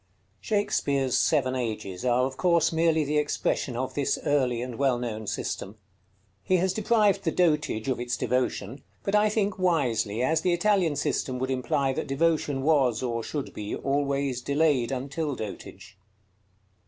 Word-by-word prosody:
Shakspeare's 140 - 0
Seven 130 -4 +2
Ages 110 -7 -4
are 125 0 +2
of 130 0 -4
course 170 -1 +2
merely 160 -1 +2
the 150 +1 +1
expression 145 -3 -1
of 130 +1 -3
this 140 -2 0
early 130 -5 +1
and 125 -1 -7
well 135 -3 +2
known 110 -3 -5
system. 100 +2 -4 0.7
He 185 - +2
has 185 +1 +1
deprived 210 -2 +2
the 165 - +1
dotage 150 -10 +1
of 130 -2 0
its 120 0 -2
devotion; 125 0 -1 0.2
but 195 - -2
I 210 0 +4
think 205 -3 -1
wisely, 125 - +1
as 160 +5 +2
the 180 - +2
Italian 175 -3 +2
system 130 -2 -1
would 130 +1 -2
imply 130 +1 0
that - - -3
devotion 145 -1 0
was, 135 -6 +2
or 115 -2 -1
should 145 +2 -5
be, 105 0 -4
always 140 -2 -1
delayed 140 -3 +1
until 140 +3 -3
dotage. 95 -3 -9
140 Hz, 155 wpm, -27 LUFS, 125-165 Hz, 0.7 s, I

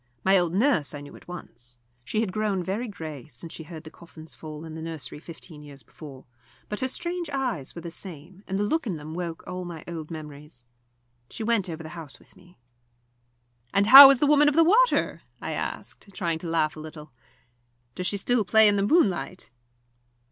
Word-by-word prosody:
My 190 +1 +4
old 175 -2 +2
nurse 195 - +2
I 145 - -7
knew 145 0 -11
at - - -16
once. 120 -9 -10 0.3
She 215 - -1
had 215 -5 -2
grown 210 -4 -1
very 205 +7 -3
grey 155 - -8
since 150 +4 -10
she - - -8
heard 160 0 -9
the 155 - -11
coffins 160 -1 -13
fall 155 0 -9
in 160 - -8
the 160 - -7
nursery 160 -3 -7
fifteen 160 -1 -11
years 145 -3 -12
before, 135 +1 -12 0.4
but 210 - -3
her 260 - 0
strange 345 +4 -4
eyes 255 - -3
were 170 - -7
the 170 - -6
same, 180 +2 -10
and 190 - -2
the 205 - 0
look 295 +6 0
in 180 -6 -2
them 155 +1 -8
woke 170 -1 -5
all 180 0 -5
my 170 -3 -8
old 165 -3 -6
memories. 150 -5 -9 0.6
She 225 - -6
went 220 -5 +1
over 160 -1 -6
the 155 - -8
house 160 -4 -10
with - - -24
me. 180 -1 -20 1.2
"And 200 0 +4
how 270 +5 +13
is 275 -2 +4
the 295 - +3
Woman 295 0 +5
of 290 - -3
the 330 - +6
Water?" 460 +9 +3 0.2
I - - -5
asked, - - -5
trying 170 -3 -1
to 170 - -6
laugh 160 -2 +1
a - - -9
little. 155 -1 -10 0.8
"Does 180 +6 -3
she 200 - 0
still 240 +3 +1
play 220 +3 +5
in 205 -1 +3
the 200 0 +1
moonlight?" 195 - +1
175 Hz, 205 wpm, -26 LUFS, 155-215 Hz, 1.2 s, how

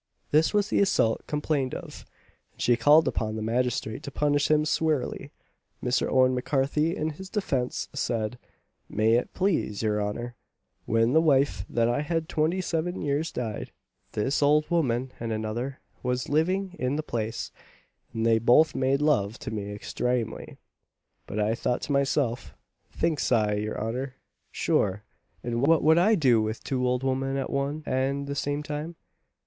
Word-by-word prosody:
This 155 +2 +4
was 210 -1 +1
the - - +2
assault 150 - +2
complained 150 -3 -1
of, - - -9 0.5
and - - -31
she 120 - +3
called 150 +6 +5
upon 110 -1 -1
the 110 - -3
magistrate 115 -1 -1
to - - -6
punish 145 +1 +1
him 155 0 +3
sewerely. 155 -2 -1 0.5
Mr. 125 +1 +1
Owen 130 -1 +4
M'Carthy 140 +5 0
in 155 +1 -2
his 190 +5 -10
defence 135 - -2
said, 115 0 -2 0.5
"May 110 +2 +2
it 120 - +1
plase 170 - 0
your 105 -1 +1
honour, 120 +4 -3 0.5
when 115 +2 +2
the 160 - +5
wife 140 -3 +2
that 115 -1 +1
I 120 +4 +1
had 160 +1 -2
twenty 160 +4 0
seven 175 +1 -2
years 150 +3 -1
died, 115 -4 -4 0.4
this 130 +8 0
ould 150 +3 +3
woman 130 -6 +1
and 115 -1 -3
another 110 +5 -3 0.2
was 125 0 -2
living 185 +5 0
in 130 +2 0
the 155 - -2
place, 115 -4 -3 0.6
and 115 0 -2
they 115 -1 +4
both 125 +8 +5
made 135 +2 +1
love 115 -8 +2
to - - -6
me 105 -2 -4
extramely. 120 +2 -3 0.7
But 105 - -4
I 105 +1 +2
thought 120 +1 -1
to - - -3
myself, 140 -3 0 0.4
thinks 155 -5 0
I, 105 -3 +3
your 105 +1 -2
honour, 125 +4 -3 0.4
sure 100 +2 0 0.4
and 120 0 -2
what 160 +3 +4
would 160 +2 +5
I 215 +5 +4
do 130 - +4
with 110 +1 -3
two 125 -2 -1
ould 125 +1 0
women 135 +1 0
at 135 - -3
one 140 +3 -2
and 135 +2 -1
the 140 - -4
same 145 +1 -2
time? 150 +3 -5
135 Hz, 165 wpm, -27 LUFS, 115-150 Hz, 0.7 s, called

